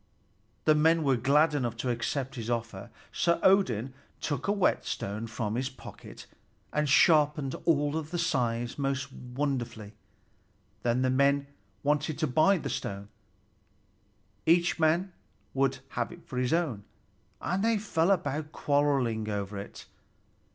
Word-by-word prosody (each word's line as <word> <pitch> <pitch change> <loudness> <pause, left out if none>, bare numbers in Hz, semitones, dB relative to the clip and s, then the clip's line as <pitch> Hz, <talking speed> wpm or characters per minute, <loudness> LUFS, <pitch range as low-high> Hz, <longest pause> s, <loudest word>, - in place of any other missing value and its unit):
The 155 - +6
men 160 +2 +3
were 135 -2 +3
glad 145 +6 +3
enough 120 -5 -1
to 125 +2 -1
accept 130 +3 -2
his 115 -3 -5
offer, 115 -5 -3 0.2
so 170 0 +1
Odin 135 - +3 0.3
took 145 +3 -3
a - - +3
whetstone 115 - -1
from 110 -1 -3
his 130 +3 -1
pocket 130 - -12 0.5
and 150 -1 +1
sharpened 150 -2 +4
all 145 -3 +3
the 160 +3 -5
scythes 120 -7 -1
most 135 0 -2
wonderfully. 125 -5 -4 0.9
Then 120 +2 +1
the 130 - +2
men 140 +1 +3 0.4
wanted 150 +1 0
to 155 - +1
buy 155 +9 +4
the - - -5
stone; 100 +1 -4 1.4
each 170 +1 +3
man 170 +4 +2 0.4
would 135 0 +1
have 120 -1 -3
it 175 -1 -13
for 145 -7 -7
his 125 -1 0
own, 155 -12 0 0.6
and 185 +3 -1
they 225 -1 +3
fell 175 -5 0
to 155 -1 -3
quarreling 135 -8 +1
over 100 -1 -3
it. 100 - -9
140 Hz, 135 wpm, -29 LUFS, 120-160 Hz, 1.4 s, The